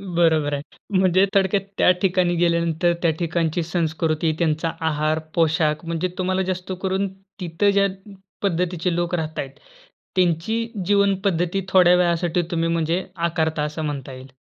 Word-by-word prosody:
बरोबर 160 -4 +3
आहे. 140 - -2 0.4
म्हणजे 185 0 +4
थोडक्यात 195 0 +3 0.2
त्या - - +5
ठिकाणी 180 -2 +2
गेल्यानंतर 170 0 +2
त्या 165 -2 +3
ठिकाणची 170 0 0
संस्कृती, 160 -1 0
त्यांचा 160 -1 0 0.2
आहार, 155 +1 0 0.2
पोशाख, 160 -1 +1
म्हणजे 170 +2 -1
तुम्हाला 185 0 0
जास्त 185 +1 -5
करून 190 +1 0 0.3
तिथे 180 +4 +1
ज्या 200 0 +3 0.5
पद्धतीचे 180 -2 0
लोक 175 0 0
राहात 160 -2 -4
आहेत. 135 - -4 0.6
त्यांची 180 +4 +1 0.3
जीवनपद्धती 195 -2 +1
थोड्या 180 -2 +6
वेळासाठी 175 0 +1
तुम्ही 165 -1 0
म्हणजे 165 +2 0 0.3
आकारता 160 -2 -1
असं 150 +2 -4
म्हणता 140 -3 -5
येईल. 130 +1 -10
170 Hz, 135 wpm, -22 LUFS, 160-185 Hz, 0.6 s, थोड्या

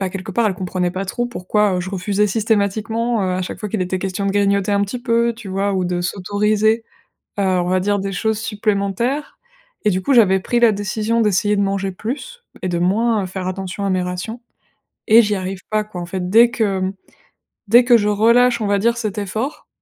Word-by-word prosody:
bah, 190 - -1
quelque 195 +1 -6
part, 230 +4 +2
elles 195 - -2
comprenaient 180 -1 -2
pas 190 +2 -4
trop 240 +5 -2
pourquoi, 210 -2 0
heu, - - -1
je 185 +1 -5
refusais 200 +2 0
systématiquement, 220 +2 0
heu, 185 -1 -1
à 185 - -2
chaque 180 - -6
fois 210 - -4
qu'il 215 - -2
était 185 +1 -2
question 195 +1 -2
de 195 - 0
grignoter 200 0 +1
un 200 - +2
petit 220 +5 -4
peu, 235 -1 +2
tu 225 -2 -12
vois? 195 +1 -1
Ou 185 -1 0
de 175 0 -1
s'autoriser, 210 +4 +1 0.6
heu, - - +1
on 185 -2 +1
va 185 +1 +2
dire 205 +2 0
des 195 0 -3
choses 220 +3 -1
supplémentaires 215 +5 -2 0.5
et 210 - +4
du 185 -1 0
coup, 275 - +2
j'avais 190 -5 +5
pris 240 +5 0
la 235 -2 +5
décision 210 +3 -1
d'essayer 205 0 +2
de 200 - +2
manger 195 -1 -1
plus 295 - -6 0.2
et 185 - -1
de 175 - -1
moins, 210 +5 +1
heu, - - -4
faire 185 0 -5
attention 190 +1 -4
à 195 - 0
mes 185 -1 +1
rations 180 +6 -5 0.7
et 225 +2 +8
j'y 210 -1 0
arrive 190 0 -5
pas 215 0 +1
quoi. 210 -4 -8
En - - -6
fait, 180 0 -4
dès 230 +4 +6
que, 205 -5 0
mmh, 185 0 -1 0.8
dès 240 +4 +6
que 245 -1 +6
je 210 -1 0
relâche, 235 +3 +3
on 215 - -1
va 200 0 +2
dire 235 +3 +1
cet 215 -3 -3
effort, 215 +8 -4
205 Hz, 225 wpm, -19 LUFS, 190-225 Hz, 0.8 s, et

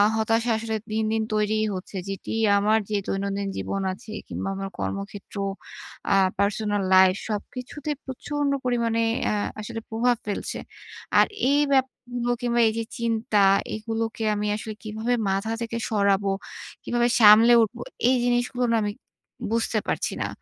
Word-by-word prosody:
হতাশা 225 +2 +1
আসলে 220 0 -3 0.2
দিন, 220 0 0
দিন 220 0 +1
তৈরি 215 0 +1 0.2
হচ্ছে। 185 +1 -7
যেটি 195 -1 -5 0.3
আমার 215 +2 +3
যে 210 - -1
দৈনন্দিন 200 0 -2
জীবন 195 - -2
আছে 200 +3 -9 0.2
কিংবা - - -4
আমার 195 0 -4
কর্মক্ষেত্র, 200 +1 -5 0.8
আ - - +5 0.3
পার্সোনাল 205 0 +1
লাইফ 185 0 +6
সবকিছুতে 250 +7 -5
প্রচন্ড 285 +2 -2
পরিমাণে 235 -2 +1 0.2
অ্যা 215 - +1 0.2
আসলে 225 +2 -5
প্রভাব 240 +2 +2
ফেলছে। 205 -1 -3 0.6
আর - - +7 0.3
এই 285 - +4
ব্যাপারগুলো 245 -2 0
কিংবা 240 -1 +1
এই 220 - +1
যে 230 - -1
চিন্তা 230 -1 0 0.4
এগুলোকে 225 +1 -3
আমি 210 0 -1
আসলে 215 +1 -5
কীভাবে 220 +3 -2 0.2
মাথা 195 +3 -1
থেকে 230 0 -3
সরাবো? 200 -2 +2 0.5
কীভাবে 240 0 +1
সামলে 220 +2 +8
উঠব? 225 +2 -3 0.3
এই 260 - +4
জিনিসগুলো 245 +1 +1
না - - +3
আমি 205 - -1 0.6
বুঝতে 230 -1 +1
পারছি - - -1
না, - - 0
220 Hz, 145 wpm, -25 LUFS, 205-240 Hz, 0.8 s, সামলে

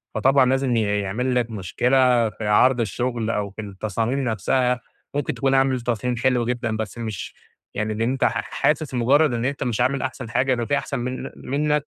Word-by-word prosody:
فطبعًا 135 +4 +4
لازم 130 -1 +1
ي 115 - +3 0.2
يعمل 125 +6 -1
لك 120 -1 +1
مشكلة 120 +4 +2
في 105 0 -6
عرض 125 +4 +4
الشغل 115 +1 -1
أو 105 -3 -1
في 105 +2 -8
التصاميم 110 +5 -2
نفسها 125 +3 +1 0.3
ممكن 145 -1 -1
تكون 135 -1 0
عامل 135 -2 +2
تصميم 120 +1 -1
حلو 125 -1 +2
جدًا، 120 -2 -2
بس 110 0 -5
مش 110 -4 -5 0.4
يعني 110 +1 -2
إن 110 - -4
أنت 130 +4 0
ح - - +2
حاسس 150 -2 0
مجرد 135 +4 +3
إن 120 0 -1
أنت 140 +1 -2
مش 120 -1 -1
عامل 130 +1 +1
أحسن 125 -2 -4
حاجة 130 +3 +2
ده 120 -2 -1
في 145 +4 +1
أحسن 140 -3 -3
من 125 +1 -4
منك 150 +2 -1
125 Hz, 190 wpm, -23 LUFS, 110-130 Hz, 0.4 s, فطبعًا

